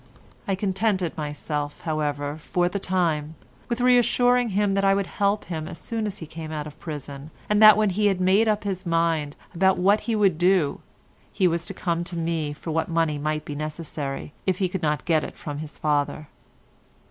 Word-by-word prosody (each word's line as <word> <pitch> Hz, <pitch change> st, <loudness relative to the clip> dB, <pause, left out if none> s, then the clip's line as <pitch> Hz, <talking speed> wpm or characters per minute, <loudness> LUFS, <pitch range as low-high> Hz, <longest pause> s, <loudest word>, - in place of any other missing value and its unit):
I 195 Hz, -, +1 dB
contented 190 Hz, -2 st, 0 dB
myself, 150 Hz, -1 st, -4 dB
however, 145 Hz, -3 st, -2 dB
for 175 Hz, +3 st, 0 dB
the 200 Hz, +3 st, -2 dB
time, 165 Hz, -5 st, 0 dB, 0.3 s
with 235 Hz, 0 st, -1 dB
assuring 245 Hz, 0 st, +4 dB
him 205 Hz, 0 st, +1 dB
that 195 Hz, 0 st, +1 dB
I 195 Hz, 0 st, +4 dB
would 200 Hz, 0 st, 0 dB
help 200 Hz, +2 st, 0 dB
him 160 Hz, -3 st, -4 dB
as -, -, -7 dB
soon 225 Hz, -2 st, -3 dB
as 205 Hz, -, -5 dB
he 160 Hz, -, -7 dB
came 160 Hz, 0 st, -8 dB
out 150 Hz, -1 st, -4 dB
of 150 Hz, 0 st, -11 dB
prison, 145 Hz, -2 st, -7 dB, 0.2 s
and 210 Hz, 0 st, +2 dB
that, 215 Hz, -1 st, +10 dB
when 215 Hz, -2 st, +2 dB
he 205 Hz, +3 st, +2 dB
had 195 Hz, -2 st, +1 dB
made 190 Hz, +5 st, +4 dB
up 210 Hz, -1 st, +1 dB
his 190 Hz, -2 st, -3 dB
mind 165 Hz, -4 st, 0 dB, 0.2 s
what 190 Hz, +3 st, +3 dB
he 230 Hz, -, -1 dB
would 195 Hz, -6 st, +2 dB
do, 180 Hz, -5 st, +3 dB, 0.5 s
he 185 Hz, -, +2 dB
was 170 Hz, 0 st, -1 dB
to 195 Hz, -, -5 dB
come 170 Hz, -2 st, -1 dB
to 175 Hz, -, -7 dB
me 165 Hz, -2 st, -1 dB
for 150 Hz, +3 st, -6 dB
what 160 Hz, +2 st, -1 dB
money 165 Hz, -3 st, +1 dB
might 155 Hz, +1 st, -2 dB
be 145 Hz, -, -5 dB
necessary, 150 Hz, -2 st, -5 dB
if 185 Hz, -2 st, +2 dB
he 190 Hz, -, +1 dB
could 180 Hz, 0 st, -4 dB
not 150 Hz, -4 st, 0 dB
get 160 Hz, -3 st, +2 dB
it -, -, -7 dB
from 145 Hz, -3 st, -6 dB
his 150 Hz, -2 st, -8 dB
father. 150 Hz, 0 st, -1 dB
170 Hz, 200 wpm, -25 LUFS, 150-195 Hz, 0.5 s, that